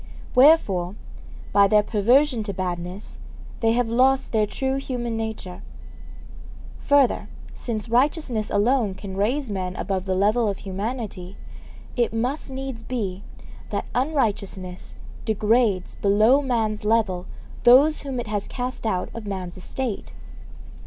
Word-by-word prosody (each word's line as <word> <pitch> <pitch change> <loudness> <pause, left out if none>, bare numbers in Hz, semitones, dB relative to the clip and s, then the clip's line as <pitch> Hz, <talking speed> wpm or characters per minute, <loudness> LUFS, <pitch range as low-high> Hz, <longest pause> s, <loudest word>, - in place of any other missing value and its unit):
Wherefore, 210 - +4 0.6
by 200 0 +6
their 210 +1 +4
perversion 240 +5 +3
to 200 - -3
badness, 180 +1 -5 0.4
they 225 -1 +3
have 245 0 +1
lost 260 +3 +2
their 215 -2 +2
true 265 +4 -2
human 245 -4 -3
nature. 220 -5 -5 1.2
Further, 285 -3 +3 0.3
since 225 -2 -4
righteousness 245 -2 +1
alone 215 -2 +2
can 190 0 -7
raise 235 +5 0
men 185 -2 -3
above 190 0 -2
the 190 -1 0
level 215 +4 +2
of 200 -2 -1
humanity, 200 -2 -5 0.6
it 235 -2 0
must 255 +6 -2
needs 265 -3 -5
be 205 -6 -4 0.5
that - - -2
unrighteousness 205 - -2 0.3
degrades 215 -2 +1
below 215 +7 +4
man's 225 -6 -1
level 210 -5 +1 0.4
those 275 +6 +6
whom 270 -3 -4
it 240 - -3
has 205 -2 -3
cast 250 -2 -4
out 185 -4 -1
of 225 -2 -7
man's 185 -3 -5
estate. 220 +4 -5
220 Hz, 125 wpm, -24 LUFS, 200-255 Hz, 1.2 s, by